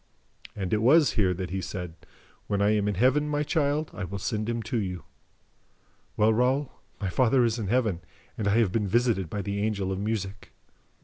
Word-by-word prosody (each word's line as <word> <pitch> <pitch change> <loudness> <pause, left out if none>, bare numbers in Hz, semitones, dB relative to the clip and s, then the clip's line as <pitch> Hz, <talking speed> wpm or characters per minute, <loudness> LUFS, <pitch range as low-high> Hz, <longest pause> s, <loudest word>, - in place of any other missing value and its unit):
"And 95 -2 -3
it 105 - +2
was 145 +6 +5
here 100 -6 +2
that 90 -1 -5
he 95 0 -2
said, 90 -3 -5 0.5
'When 100 - 0
I 100 +1 +3
am 105 -1 +1
in 105 - 0
Heaven, 135 +8 +2
my 150 0 0
child, 150 0 0
I 105 - -5
will 95 +2 -4
send 110 +2 -2
him 115 -1 -2
to 115 +3 -2
you.' 90 -6 -4 1.1
Well, 110 +1 +4
Raoul, 130 +4 +1 0.3
my 100 - -2
father 125 +4 +3
is 115 0 0
in 105 - -3
Heaven, 110 -6 +1 0.3
and 110 -5 -2
I 100 +2 +3
have 110 -6 +3
been 105 0 0
visited 110 -4 +1
by 100 +2 -3
the 100 +1 -2
Angel 100 -3 -1
of 95 - -2
Music." 100 -1 -4
105 Hz, 200 wpm, -27 LUFS, 95-125 Hz, 1.1 s, was